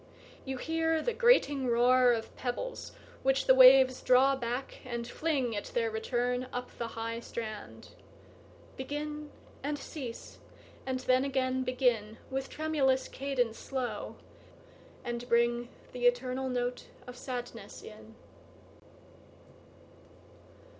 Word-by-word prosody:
you 265 Hz, -1 st, -3 dB
hear 325 Hz, +3 st, 0 dB
the 480 Hz, +9 st, -1 dB
grating 435 Hz, -, +4 dB
roarOf 245 Hz, -1 st, +3 dB
pebbles 370 Hz, -, -4 dB, 0.3 s
which 270 Hz, 0 st, +2 dB
the 260 Hz, -, +7 dB
waves 260 Hz, 0 st, +8 dB
draw 265 Hz, +2 st, +5 dB
back, 245 Hz, +1 st, -4 dB
and 235 Hz, -2 st, -4 dB
fling, 270 Hz, -6 st, -1 dB
At 205 Hz, -, -3 dB
their 460 Hz, -2 st, +1 dB
return, 250 Hz, -, -1 dB
up 250 Hz, 0 st, -5 dB
the 235 Hz, -, -2 dB
high 230 Hz, +1 st, -3 dB
strand, 220 Hz, -2 st, -7 dB, 0.9 s
Begin, 295 Hz, +2 st, -5 dB, 0.3 s
and 290 Hz, +2 st, -2 dB
cease, 270 Hz, -4 st, -8 dB, 0.5 s
and 260 Hz, -1 st, -1 dB
then 255 Hz, 0 st, +3 dB
again 260 Hz, -1 st, 0 dB
begin, 245 Hz, -4 st, 0 dB
With 265 Hz, 0 st, -3 dB
tremulous 280 Hz, -4 st, +1 dB
cadence 255 Hz, -5 st, -2 dB
slow, 260 Hz, -3 st, -4 dB, 0.9 s
and 240 Hz, -1 st, -4 dB
bringThe 235 Hz, +1 st, +2 dB, 0.2 s
eternal 250 Hz, +1 st, +1 dB
note 245 Hz, 0 st, -2 dB, 0.2 s
of 250 Hz, -, -9 dB
sadness 250 Hz, -1 st, -7 dB
in. -, -, -12 dB
255 Hz, 110 wpm, -31 LUFS, 245-275 Hz, 0.9 s, waves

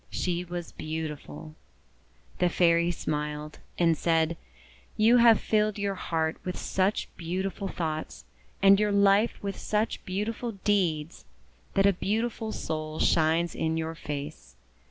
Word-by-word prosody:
She 175 Hz, -1 st, -1 dB
was 175 Hz, -1 st, -6 dB
beautiful. 155 Hz, 0 st, -6 dB, 0.9 s
The 180 Hz, -, +3 dB
Fairy 170 Hz, 0 st, +3 dB
smiled, 150 Hz, -2 st, -4 dB, 0.2 s
and 165 Hz, -2 st, +3 dB
said: 165 Hz, +1 st, +1 dB, 0.3 s
— -, -, -28 dB
'You 225 Hz, +3 st, +6 dB
have 235 Hz, -2 st, +7 dB
filled 215 Hz, -1 st, +1 dB
your 200 Hz, -1 st, -1 dB
heart 160 Hz, -4 st, -2 dB
with 180 Hz, -, -4 dB
such 190 Hz, +2 st, 0 dB
beau 175 Hz, +3 st, -3 dB
tiful 195 Hz, +1 st, -4 dB
thoughts, 160 Hz, -4 st, -4 dB, 0.4 s
and 195 Hz, 0 st, +7 dB
your 210 Hz, -1 st, +2 dB
Me 200 Hz, +2 st, +4 dB
with 200 Hz, -1 st, -4 dB
such 215 Hz, +1 st, -1 dB
beautiful 220 Hz, +5 st, -3 dB
deeds, 170 Hz, -6 st, 0 dB, 0.5 s
that 195 Hz, -1 st, +4 dB
a 200 Hz, -, +5 dB
beautiful 220 Hz, +4 st, -2 dB
soul 155 Hz, -5 st, -4 dB
shines 165 Hz, +2 st, +2 dB
in 160 Hz, 0 st, -1 dB
your 160 Hz, 0 st, -2 dB
face. 145 Hz, -, -7 dB
175 Hz, 135 wpm, -28 LUFS, 160-200 Hz, 0.9 s, have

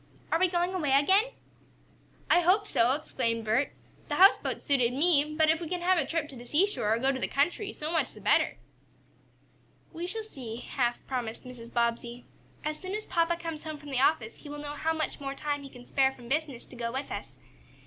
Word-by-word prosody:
"Are 325 Hz, -, +3 dB
we 370 Hz, -, +5 dB
going 350 Hz, +1 st, 0 dB
away 300 Hz, -7 st, 0 dB
again?" 380 Hz, -, +5 dB, 1.0 s
"I 350 Hz, -, +5 dB
hope 380 Hz, +4 st, +4 dB
so!" 245 Hz, -, +3 dB
exclaimed 230 Hz, -6 st, -2 dB
Bert. 230 Hz, +6 st, +2 dB, 0.4 s
"The -, -, -1 dB
houseboat 390 Hz, +2 st, +5 dB
suited 250 Hz, -5 st, +2 dB
me, 300 Hz, 0 st, +2 dB
but 315 Hz, -1 st, +4 dB
if 320 Hz, +1 st, -1 dB
we 330 Hz, -, -5 dB
can 360 Hz, -1 st, -2 dB
have 365 Hz, 0 st, +3 dB
a -, -, -1 dB
trip 325 Hz, -3 st, -1 dB
to 275 Hz, -, -10 dB
the 240 Hz, -, -9 dB
seashore, 310 Hz, -, +2 dB
or 225 Hz, -, +3 dB
go 265 Hz, +3 st, +2 dB
to 265 Hz, -, -3 dB
the -, -, -1 dB
country, 350 Hz, -, 0 dB
so 305 Hz, +1 st, -4 dB
much 330 Hz, -, 0 dB
the -, -, -12 dB
better." -, -, +2 dB, 1.4 s
"We 340 Hz, +2 st, -4 dB
shall 445 Hz, +4 st, -4 dB
see," 255 Hz, -, -7 dB
half 245 Hz, 0 st, -2 dB
promised 240 Hz, -4 st, -4 dB
Mrs. 245 Hz, -2 st, -10 dB
Bobbsey. 235 Hz, +1 st, -1 dB, 0.4 s
"As 305 Hz, 0 st, -2 dB
soon 375 Hz, +2 st, -4 dB
as 430 Hz, -, -4 dB
papa 340 Hz, -1 st, +1 dB
comes 330 Hz, -3 st, -5 dB
home 310 Hz, -1 st, -5 dB
from 290 Hz, -1 st, -10 dB
the 260 Hz, -, 0 dB
office, 240 Hz, -6 st, +2 dB
he 290 Hz, -, -11 dB
will 295 Hz, -, -6 dB
know 290 Hz, 0 st, -5 dB
how 320 Hz, +2 st, 0 dB
much 315 Hz, 0 st, -3 dB
more 275 Hz, -1 st, -4 dB
time 290 Hz, 0 st, -2 dB
he 275 Hz, -, -9 dB
can 245 Hz, -2 st, -13 dB
spare 265 Hz, 0 st, +3 dB
from 245 Hz, -3 st, -13 dB
business 280 Hz, -2 st, -2 dB
to -, -, -13 dB
go 235 Hz, -1 st, -3 dB
with 265 Hz, +3 st, -4 dB
us. -, -, -6 dB
290 Hz, 220 wpm, -29 LUFS, 250-335 Hz, 1.4 s, we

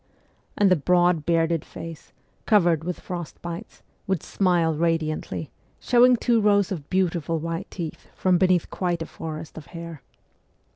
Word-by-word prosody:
And 200 Hz, -2 st, +4 dB
the -, -, +7 dB
broad, 175 Hz, 0 st, +2 dB
bearded 165 Hz, -1 st, +2 dB
face, 165 Hz, -2 st, -9 dB, 0.4 s
covered 175 Hz, -7 st, +4 dB
with 180 Hz, +1 st, -4 dB
frost 175 Hz, -3 st, -6 dB
bites, 170 Hz, 0 st, -7 dB, 0.2 s
would 190 Hz, -4 st, 0 dB
smile 175 Hz, -4 st, +2 dB
radiantly, 160 Hz, -3 st, -1 dB, 0.3 s
showing 250 Hz, +1 st, +5 dB
two 235 Hz, -1 st, +2 dB
rows 205 Hz, -2 st, +3 dB
of 155 Hz, -6 st, -5 dB
beautiful 170 Hz, -3 st, 0 dB
white 165 Hz, +3 st, -4 dB
teeth 165 Hz, -4 st, -7 dB
from 185 Hz, -2 st, +2 dB
beneath 185 Hz, -2 st, +2 dB
quite 175 Hz, -3 st, -1 dB
a -, -, -6 dB
forest 160 Hz, 0 st, -7 dB
of 150 Hz, -, -14 dB
hair. 165 Hz, -4 st, -8 dB
170 Hz, 145 wpm, -24 LUFS, 165-185 Hz, 0.4 s, the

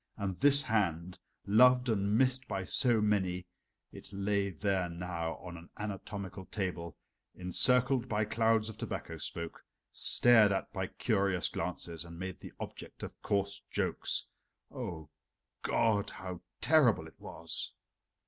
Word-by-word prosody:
And 100 Hz, -3 st, -2 dB
this 140 Hz, 0 st, +5 dB
hand, 90 Hz, -6 st, 0 dB, 0.3 s
loved 125 Hz, +4 st, +6 dB
and 105 Hz, -2 st, +2 dB
missed 130 Hz, +1 st, +2 dB
by 95 Hz, -, -3 dB
so 120 Hz, -1 st, +3 dB
many 95 Hz, -4 st, +1 dB, 0.5 s
it -, -, -11 dB
lay 100 Hz, 0 st, 0 dB
there 95 Hz, 0 st, 0 dB
now 85 Hz, -1 st, -3 dB
on 90 Hz, -2 st, -9 dB
an 85 Hz, +1 st, -13 dB
anatomical 100 Hz, -2 st, -5 dB
table, 90 Hz, -6 st, -4 dB, 0.4 s
encircled 125 Hz, +7 st, +2 dB
by 110 Hz, -1 st, +1 dB
clouds 110 Hz, 0 st, +2 dB
of 110 Hz, -, -8 dB
tobacco -, -, -5 dB
smoke, 85 Hz, -1 st, -4 dB, 0.3 s
stared 115 Hz, -4 st, +6 dB
at 95 Hz, -, -2 dB
by -, -, -2 dB
curious 95 Hz, -2 st, +1 dB
glances, 85 Hz, -1 st, -3 dB
and 85 Hz, 0 st, -10 dB
made 95 Hz, 0 st, -5 dB
the -, -, -9 dB
object -, -, -8 dB
of -, -, -8 dB
coarse 100 Hz, -1 st, -1 dB
jokes. -, -, -1 dB, 0.5 s
O 80 Hz, -3 st, -6 dB, 0.5 s
God! 105 Hz, -3 st, +2 dB
how 90 Hz, -2 st, -7 dB, 0.2 s
terrible 130 Hz, -, +4 dB
it 80 Hz, -, -15 dB
was! -, -, -5 dB
100 Hz, 135 wpm, -32 LUFS, 90-110 Hz, 0.5 s, loved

